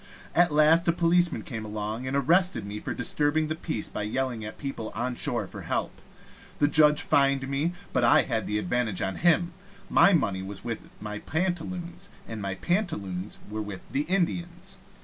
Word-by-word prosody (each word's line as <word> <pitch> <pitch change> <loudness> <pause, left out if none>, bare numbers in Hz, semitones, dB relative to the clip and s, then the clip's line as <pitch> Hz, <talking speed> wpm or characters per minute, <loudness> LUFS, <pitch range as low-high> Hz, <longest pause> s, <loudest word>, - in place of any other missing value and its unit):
At 175 -1 +4
last 155 +3 +4
a - - +6
policeman 175 +1 +2
came 115 -10 -5
along, 110 +3 -4
and 135 +2 0
arrested 175 - +2
me 105 +1 -5
for - - -5
disturbing 150 +5 +1
the 155 - -1
peace 155 -8 -3
by - - -5
yelling 115 +2 -2
at 105 - -7
people 135 -6 -5
on 125 +3 -1
shore 120 -2 -2
for - - -9
help. - - -3 0.6
The 145 - +3
judge 150 0 +5
fined 140 -3 +2
me, 145 +5 0 0.2
but 130 - +2 0.2
had 115 -3 -2
the 105 - 0
advantage 110 -3 -1
of 95 0 -2
him. 175 0 +3 0.4
My - - +6
money 100 - +1
was 95 0 -6
with 115 -1 -5
my 105 0 -5
pantaloons, 175 - -3 0.2
and 110 -2 -6
my 100 -1 -3
pantaloons 100 - -2
were 110 +1 -4
with 105 -3 -6
the 145 +2 0
Indians. 180 0 -2
135 Hz, 175 wpm, -27 LUFS, 110-170 Hz, 0.6 s, a